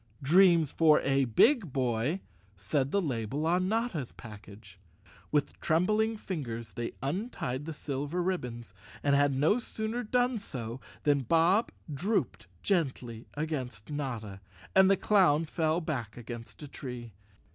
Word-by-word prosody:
"Dreams 170 0 +5
for 160 -2 +5
a 135 0 +2
big 180 - +4
boy," 130 +6 0 0.4
said 130 +8 0
the 200 +5 +1
label 135 +1 -2
on 180 +3 +2
Notta's 220 - -1
package. 100 -3 -12 0.5
With 150 -1 0
trembling 215 +7 +2
fingers 120 - -5
they 115 +4 -4
untied 145 - -3
the 165 - -5
silver 145 +5 -3
rib¬ 185 0 0
bons, 120 -4 -8 0.3
and 140 -1 +3
had 140 -1 +3
no 155 - +3
sooner 225 0 -3
done 245 +1 +1
so 125 - -6 0.2
than 145 -1 +3
Bob 165 - +3 0.2
drooped 135 - -1 0.2
gently 130 - -1
against 135 -7 -4
Notta, 115 -9 -4 0.3
and 190 0 +7
the 195 - +4
clown 175 -7 +4
fell 160 +1 0
back 120 -10 -4
against 120 +3 -9
a - - -7
tree. 125 -5 -8
145 Hz, 135 wpm, -30 LUFS, 120-180 Hz, 0.5 s, and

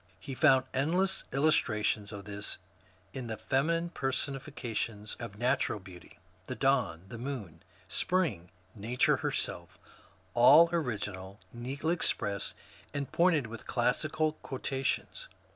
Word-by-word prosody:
He 135 +9 -6
found 130 0 +5
endless 180 +8 +1
illustrations 110 -8 +2
of 100 -2 -8
this 100 0 -4 0.6
in 130 -3 -5
the 110 -1 -4
feminine 165 +8 +1
person 135 0 -1
ifications 115 -6 -4
of 115 -4 -7
natural 125 -2 +1
beauty, 90 -2 -13
— - - -31
the - - -4
Dawn, 80 +1 +1
the 120 - -7
Moon, 115 - -5 0.3
Spring, 135 - 0 0.2
Nature 115 +4 +2
herself, - - -3 0.3
— 95 0 -31
all 145 +8 +8
original, 105 - -3 0.2
neatly 135 +7 -2
expressed, 100 - -1 0.4
and 140 -1 -3
pointed 170 -6 +3
with 115 0 -9
classical 155 +5 +1
quotations. 135 - -2
125 Hz, 125 wpm, -31 LUFS, 105-145 Hz, 0.6 s, all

